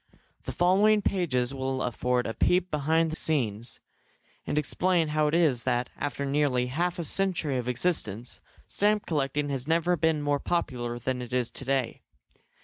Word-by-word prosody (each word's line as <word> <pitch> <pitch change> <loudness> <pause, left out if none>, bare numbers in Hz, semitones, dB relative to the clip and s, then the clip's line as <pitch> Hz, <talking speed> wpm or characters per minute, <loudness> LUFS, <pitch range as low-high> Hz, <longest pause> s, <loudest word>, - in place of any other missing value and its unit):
The - - -3
following 200 +4 +3
pages 135 -9 0
will 130 -1 -2
afford 125 +1 0
a 115 - -3
peep 180 +6 +1
behind 160 +2 +1
the - - -3
scenes, 120 -9 -1 0.7
and - - -1
explain 165 +2 +1
how 150 0 +1
it 150 - +1
is 150 -8 +3
that, 125 -1 -1
after 140 -1 -3
nearly 135 -3 +1
half 175 +3 0
a 170 - -3
century 165 -6 +1
of 125 - -5
existence, 125 - -1 0.2
stamp 210 +1 +1
collecting 145 -1 -1
has 135 -1 -3
never 170 +2 +2
been 160 -2 +1
more 145 -1 +1
popular 120 -9 -2
than 125 +1 -3
it 125 -1 -7
is 125 -2 0
to 135 - -9
day. 130 -3 -1
145 Hz, 165 wpm, -27 LUFS, 125-170 Hz, 0.7 s, following